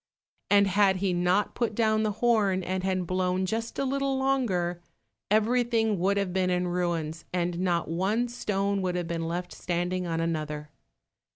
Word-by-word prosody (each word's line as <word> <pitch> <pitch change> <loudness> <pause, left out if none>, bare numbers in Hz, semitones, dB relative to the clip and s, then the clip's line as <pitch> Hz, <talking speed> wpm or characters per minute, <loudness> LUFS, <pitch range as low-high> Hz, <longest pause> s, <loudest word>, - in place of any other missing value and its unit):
And 200 0 +6
had 195 0 +3
he 190 0 0
not 180 +3 +1
put 230 -3 -1
down 220 -1 +2
the 215 -1 0
horn 205 -6 +3
and 185 +1 -2
had 185 -1 0
blown 185 +1 0
just 225 +4 -3
a 275 - 0
little 275 0 0
longer, 205 -11 0 0.5
everything 225 -1 +2
would 195 +3 +2
have 195 -3 -1
been 185 -1 +1
in 180 0 0
ruins, 170 -3 -2
and 175 -1 -1
not 175 -2 0
one 195 +8 0
stone 200 -4 -1
would 180 -1 -1
have 175 -1 -2
been 165 -1 -2
left 175 +1 -3
standing 180 +1 -2
on 165 -1 -1
another. 150 -2 -3
185 Hz, 170 wpm, -27 LUFS, 175-215 Hz, 0.5 s, And